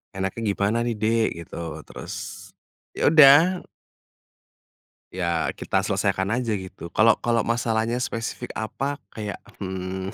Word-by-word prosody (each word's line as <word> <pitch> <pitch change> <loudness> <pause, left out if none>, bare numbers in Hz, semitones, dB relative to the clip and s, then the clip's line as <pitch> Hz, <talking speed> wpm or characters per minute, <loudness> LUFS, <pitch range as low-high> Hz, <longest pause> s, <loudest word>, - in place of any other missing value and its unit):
"Enaknya 95 +4 -3
gimana 100 +3 +1
nih 120 -1 -1
Dek?" 110 +1 +2 0.2
Gitu. - - -10 0.3
Terus, - - -8 0.8
ya - - -1
udah. 160 +4 +7 1.5
Ya, 85 -3 -1
kita - - 0
selesaikan 95 +1 0
aja 115 0 0
gitu, 95 -3 -7
kalau 115 0 +5
kalau 120 -1 +1
masalahnya 115 +1 0
spesifik 120 0 -4
apa 135 +6 -3
kayak, 105 -2 -6 0.2
mmm, 95 0 -4
110 Hz, 120 wpm, -24 LUFS, 95-120 Hz, 1.5 s, udah